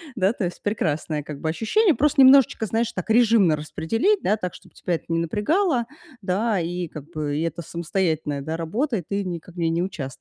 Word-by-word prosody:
Да, 200 -2 +2
то 210 - -2
есть 175 - -6
прекрасное, 155 -7 -1
как 145 -1 -8
бы 160 - -1
ощущение, 320 - +2
просто 295 -1 +3
немножечко, 265 -4 +6
знаешь, 225 +2 -1
так 185 -6 -5
режимно 220 -8 +5
распределить. 225 - 0
Да, 210 - +2
так, 180 -4 -5
чтобы - - -16
тебя 175 - -2
это - - -7
не 165 0 +1
напрягало, 240 - +1 0.4
да, 200 +3 0
и 175 +1 -3
как 150 -2 -9
бы 150 -2 -2
это 165 +1 -3
самостоятельная, 160 -4 -2
да, 160 +3 -4
работа, 225 - -1
и 180 - -5
ты 200 0 -2
никак 175 -1 -6
в - - -16
ней 165 -1 +1
не 165 +2 0
участвовала. 175 -8 -4
180 Hz, 205 wpm, -23 LUFS, 160-225 Hz, 0.4 s, немножечко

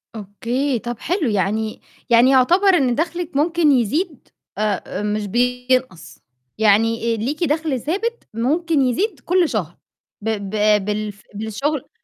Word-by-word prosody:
أوكي، 240 +6 -2
طَب 240 -1 -6
حلو، 340 - -1
يعني 215 +2 -1 0.3
يعني 235 +2 +6
يعتبر 335 +10 +4
إن 250 -3 +1
دَخْلِك 340 0 -3
ممكن 320 0 +3
يزيد 280 - 0 0.3
آآ 210 -1 -2
مش 210 0 -2
بينقص، 250 -5 -1 0.4
يعني 225 +2 +2
ليكِ 285 +10 -2
دَخْل 300 -3 0
ثابت 450 +9 -2
ممكن 300 +6 +1
يزيد 300 - 0
كل 360 -2 +1
شهر 175 -7 -3 0.4
ب 225 - -2 0.2
ب 210 -1 +2
بالف 210 -1 -4
بالشُغل 235 +7 -3
250 Hz, 125 wpm, -20 LUFS, 215-305 Hz, 0.4 s, يعني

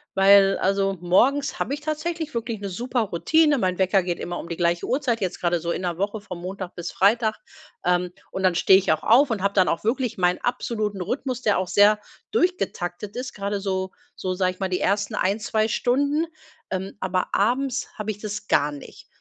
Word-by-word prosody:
weil 195 0 +6
also 195 0 +1
morgens 265 +11 +2
habe 275 - -1
ich 295 - -11
tatsächlich 310 0 -3
wirklich 230 -2 -3
'ne 200 - -5
super 240 +5 -2
Routine. 295 - +2
Mein 185 -1 0
Wecker 190 0 +3
geht 175 -1 -3
immer 175 0 -4
um 170 - -8
die 170 - -4
gleiche 170 0 +1
Uhrzeit, 250 -4 0
jetzt 185 -2 -2
gerade 175 -1 +1
so 170 +1 -3
in 185 - -3
der 175 -2 -2
Woche 205 +2 -1
von 190 -4 -8
Montag 185 0 -6
bis 175 0 -5
Freitag. 220 +3 +2 0.5
Ähm, 180 0 +1 0.2
und 190 - -4
dann 180 -2 +3
stehe 190 +2 +6
ich 195 - 0
auch 155 - 0
auf 265 +5 +5
und 220 -5 -2
habe 200 0 +1
dann 185 -2 +3
auch 165 - -1
wirklich 245 +2 -1
meinen 180 -1 +2
absoluten 215 -4 -2
Rhythmus, 250 +6 -3
der 210 - +3
auch 185 - -2
sehr 205 +3 +5 0.3
durchgetaktet 210 - -1
ist, 250 0 -5
gerade 200 0 -3
so 190 -1 -2 0.2
so, 185 -1 -3
sage 185 0 +1
ich - - -28
mal, 190 - -1
die 180 - -1
1. 205 +2 0
1, 200 +2 +1
2 220 +1 0
Stunden. 285 +7 +1 0.5
Ähm, 190 +1 -4
aber 185 -1 -1
abends 255 +5 +1
habe 215 -1 -4
ich 205 - -8
das 210 -1 -6
gar 145 0 +2
nicht. 145 -1 -11
200 Hz, 210 wpm, -24 LUFS, 185-240 Hz, 0.5 s, weil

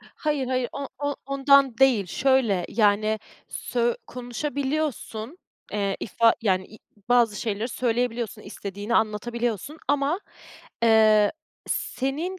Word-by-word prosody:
Hayır, 295 -4 -1
hayır, 255 -1 0
o 280 -1 -5
o 285 0 -2
ondan 275 -2 +4
değil, 250 -8 +4
şöyle, 255 -5 +2
yani, 215 0 +2 0.3
sö 240 -1 -1
konuşabiliyorsun, 270 +1 -3 0.3
eee, 200 -2 -1
ifa 230 +2 +3
yani, 185 -3 +1
i 215 - -15 0.3
bazı 235 -4 +3
şeyleri 220 +1 -2
söyleyebiliyorsun, 235 -2 -1
istediğini 205 +2 -5
anlatabiliyorsun 235 - -1
ama, 290 +6 +1 0.6
eee, 215 -2 +5 0.4
senin 310 +8 -2
240 Hz, 105 wpm, -25 LUFS, 215-275 Hz, 0.6 s, eee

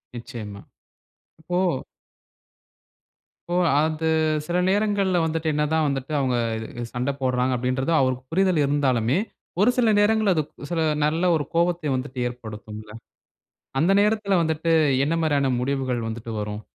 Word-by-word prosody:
நிச்சயமா. 110 -4 -8 1.0
ஓ! 180 -7 0 1.6
ஓ! 175 - -2 0.2
அது 155 +1 0 0.4
சில 175 - 0
நேரங்கள்ல 200 -2 +2
வந்துட்டு, 160 0 -1
என்னதான் 150 +1 +1
வந்துட்டு 135 0 -3
அவுங்க 130 -2 +1 0.2
இது 110 +2 -6
சண்ட 125 +3 -1
போட்றாங்க, 125 0 +1
அப்டின்றது 130 +4 -1
அவருக்கு 130 -1 0
புரிதல் 185 -2 +2
இருந்தாலுமே, 135 -2 +1 0.4
ஒரு 215 - +5
சில 230 -3 +4
நேரங்கள்ல 210 -1 +3
அது 155 - +1 0.3
சில 165 -2 0 0.2
நல்ல 165 +4 +1
ஒரு 145 -3 -1
கோவத்தை 170 -2 +1
வந்துட்டு 130 0 -5
ஏற்படுத்தும்ல! 110 -3 -9 0.9
அந்த 170 +4 +3
நேரத்துல 210 -3 +2
வந்துட்டு 160 0 -1 0.4
என்னமாரியான 150 -4 +1
முடிவுகள் 130 -3 -1
வந்துட்டு 115 0 -6
வரும்? 105 0 -5
145 Hz, 120 wpm, -24 LUFS, 125-170 Hz, 1.6 s, ஒரு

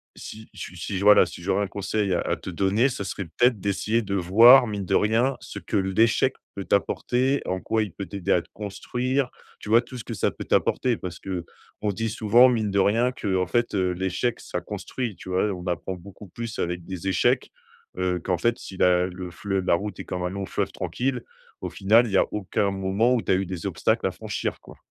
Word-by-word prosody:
si 110 0 -10
su 90 - -8
si 95 +3 -4
j 100 - -2
voilà, 105 -2 +7
si 85 - -10
j'aurais 100 +2 +1
un 100 - -2
conseil 100 0 -1
à 85 - 0
te - - -8
donner, 100 +8 +2
ce 105 - -4
serait 100 0 -4
peut-être 115 +7 +2
d'essayer 105 +3 0
de 100 -2 -3
voir, 115 +8 +7
mine 100 -2 -3
de - - +1
rien, 115 +5 +2
ce - - -8
que - - -2
l'échec 110 +7 +2 0.2
peut 100 - -5
t'apporter, 125 +6 +1
en 95 0 -2
quoi 110 -1 0
il 105 - -6
peut 100 - -6
t'aider 100 -3 -3
à 90 - +4
te 85 - -22
construire, 125 +6 -2 0.3
tu - - -9
vois? 115 +2 +6
Tout 130 - -10
ce - - -7
que - - -6
ça - - +1
peut - - -8
t'apporter. 125 -3 +1
Parce 90 -2 -7
qu'on 95 +3 -6
se - - -9
dit 115 +1 -1
souvent, 115 +3 +5
mine 110 -4 0
de 100 - +1
rien, 115 +6 +3
qu'en 95 -6 -1
fait, 120 +5 0
heu, 95 -2 +1
l'échec, 95 +6 -1
ça - - -5
construit, 120 -7 -5
tu - - -11
vois? 95 +3 +1
On 90 -1 -7
apprend 90 +2 -2
beaucoup 100 +3 -12
plus 115 +4 -6
avec 90 0 -2
des 95 0 -6
échecs, 95 - +1 0.5
heu, 90 -1 0
qu'en 90 0 -1
fait, 120 +3 +1
si 95 - -10
la 90 0 +4
le 90 0 -6
fle 95 +2 -2
la 90 - +3
route 105 +4 -5
est - - -6
comme 90 - -4
un 90 - -1
long 100 0 -4
fleuve - - -2
tranquille, 125 -1 -2 0.4
au - - -3
final, 110 +5 +4
il 105 - -6
y 95 - +4
a - - +4
aucun 100 0 0
moment 95 +5 +1
où 120 - +1
tu - - -1
as - - +5
eu 95 +1 0
des 90 -2 -5
obstacles - - 0
à - - -2
franchir, - - -4
quoi. - - -15
100 Hz, 230 wpm, -25 LUFS, 95-115 Hz, 0.5 s, voilà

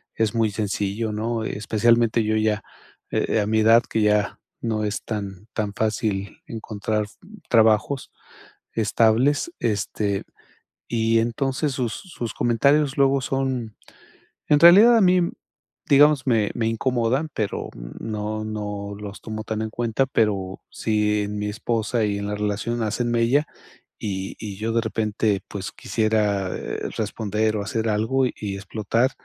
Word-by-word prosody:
es 110 -1 0
muy 110 -2 +2
sencillo, 105 +1 -2
¿no? 110 +1 -2
Especialmente 115 +2 +2
yo 110 0 +1
ya, 110 -1 +1 0.5
eh, 110 - +1
a 105 - -1
mi 110 +1 +2
edad, 115 +2 +6
que 110 - 0
ya 105 -1 +2 0.2
no 110 -2 -1
es 105 - -3
tan 100 -2 -5
tan 105 -2 -2
fácil 105 -2 -2
encontrar 110 -1 -3 0.4
trabajos 110 +4 +3 0.6
estables, 115 - +2
este, 100 -2 -1 0.6
y 115 -1 +2
entonces 135 +5 -1
sus 120 -4 -2
sus 135 - -6
comentarios 140 +5 +2
luego 140 0 +4
son 130 -5 -2 0.7
en 150 -1 +5
realidad 205 +8 +8
a 225 - +4
mí, 180 -1 +5 0.7
digamos, 145 -1 +5
me 110 -4 +2
me 115 -1 0
incomodan, 125 +5 0
pero 105 -3 -2 0.3
no 110 0 -3
no 105 -1 -4
los 105 0 -8
tomo 110 -1 -5
tan 110 0 -3
en 110 - -3
cuenta, 120 +3 0
pero 100 -6 0
sí 105 -1 +1
en 105 +1 -4
mi 105 - -2
esposa 115 +1 -1
y 100 -1 -1
en 100 - -4
la 105 - -2
relación 105 +3 -2
hacen 120 +3 -1
mella, 120 +6 +3 0.5
y 95 -2 -4
y 105 -3 -6
yo 110 +2 -2
de 115 - +3
repente, 110 -2 0
pues, 95 -2 -5
quisiera 105 -3 0 0.5
responder 110 0 -1
o - - -2
hacer 110 +1 -1
algo 110 +5 +1
y 105 -5 -5
explotar, 110 +6 0
110 Hz, 140 wpm, -23 LUFS, 105-120 Hz, 0.7 s, realidad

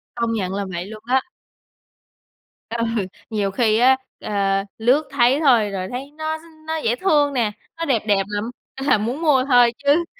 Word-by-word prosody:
Công 235 -1 -1
nhận 190 -4 -2
là 200 0 -2
vậy 175 +1 -4
luôn 215 +1 -10
á. 260 +2 +2 1.5
Ừ, 230 0 -2 0.5
nhiều 205 -3 -1
khi 220 -1 +2
á, 260 +2 +5 0.2
ơ, 195 -1 0
lướt 250 +7 +3
thấy 265 +1 +3
thôi 240 -9 +4
rồi 185 -1 -3
thấy 270 +3 -6
nó 315 0 -2
s - - -17 0.3
nó 320 - -1
dễ 235 -5 0
thương 290 -4 +2
nè, 230 -5 +1 0.3
nó 330 - -2
đẹp 235 -8 +1
đẹp 195 -2 +3
lậm 205 0 -3 0.3
à, 270 -4 +2
muốn 240 +9 -3
mua 270 -5 +3
thôi 245 -3 +5
chứ 300 +4 +3
240 Hz, 180 wpm, -21 LUFS, 210-280 Hz, 1.5 s, á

